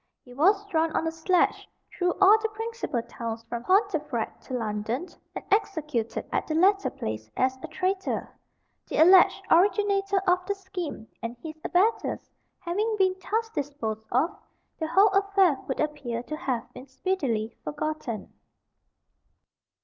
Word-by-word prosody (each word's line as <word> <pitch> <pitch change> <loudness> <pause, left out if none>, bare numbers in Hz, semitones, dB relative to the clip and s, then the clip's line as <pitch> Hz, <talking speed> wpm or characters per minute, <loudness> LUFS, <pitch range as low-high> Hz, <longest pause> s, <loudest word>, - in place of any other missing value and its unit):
He 250 - -14
was 390 +9 +3
drawn 325 -5 +1
on - - +1
a 325 - 0
sledge 335 +3 +1 0.3
through 360 -1 +1
all 395 +2 +7
the 445 - 0
principal 450 - -3
towns 230 -1 -6
from 235 +1 -5
Pontefract 315 - 0
to 260 - -4
London, 225 +5 -2 0.3
and - - -6
executed 300 - 0
at - - -1
the 310 - -1
latter 395 +4 +4
place 110 0 -5
as 260 0 +2
a - - -6
traitor. 380 +1 -2 0.5
The - - -3
alleged 360 +3 +6
originator 395 +2 +3
of 360 -1 +3
the 405 - 0
scheme 365 - -6
and 230 +1 -5
his 320 -1 -5
abettors 400 +6 +1 0.3
having 415 +6 -1
been 375 -2 +3
thus 445 +5 -1
disposed 235 - -4
of, 280 +9 +1 0.4
the 320 - -1
whole 390 +6 +5
affair 390 -6 +3
would 265 - -3
appear 285 -6 -2
to 305 - -5
have 250 -5 -3
been 255 +2 -11
speedily 265 - -2
forgotten. 295 -6 -4
320 Hz, 145 wpm, -27 LUFS, 250-390 Hz, 0.5 s, all